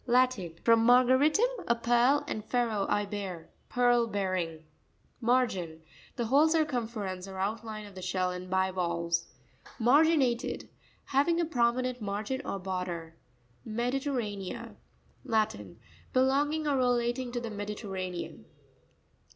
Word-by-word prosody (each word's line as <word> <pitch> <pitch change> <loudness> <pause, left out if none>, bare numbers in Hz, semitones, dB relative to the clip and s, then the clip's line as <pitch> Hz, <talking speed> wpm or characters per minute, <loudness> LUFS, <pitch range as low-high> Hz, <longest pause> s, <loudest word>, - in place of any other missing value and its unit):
— - - -31
Latin. 225 -10 +1
From 230 -1 +5
mar 245 +2 +6
garitum, 295 - +4 0.2
a 235 - +3
pearl, 240 +5 +3
and 215 - -3
fero, 225 -4 0
I 205 0 +1
bear. 195 -5 -6 0.2
Pearl 245 -1 +3
bearing. 185 -6 -2 0.6
Ma'rain.—The 205 -4 -1
whole 280 +7 +5
circumference 230 - -1
or 190 -1 -8
outline 215 +2 -3
of 205 - -12
the 185 - -9
shell 185 0 0
in 180 0 -7
bivalves. 175 -3 0 0.5
Ma'rainatep.—Having 280 +3 +1
a 340 - +2
prominent 250 -3 0
margin 210 +6 -3
or 200 - -3
border. 180 -3 -4 0.5
Mepirerra'nea.—Latin. 220 - -3 0.3
Belonging 285 +4 +2
or 285 -2 +2
relating 245 0 +1
to 245 - -1
the 235 -2 -5
Mediterranean. 200 -3 -5
225 Hz, 110 wpm, -30 LUFS, 190-255 Hz, 0.6 s, mar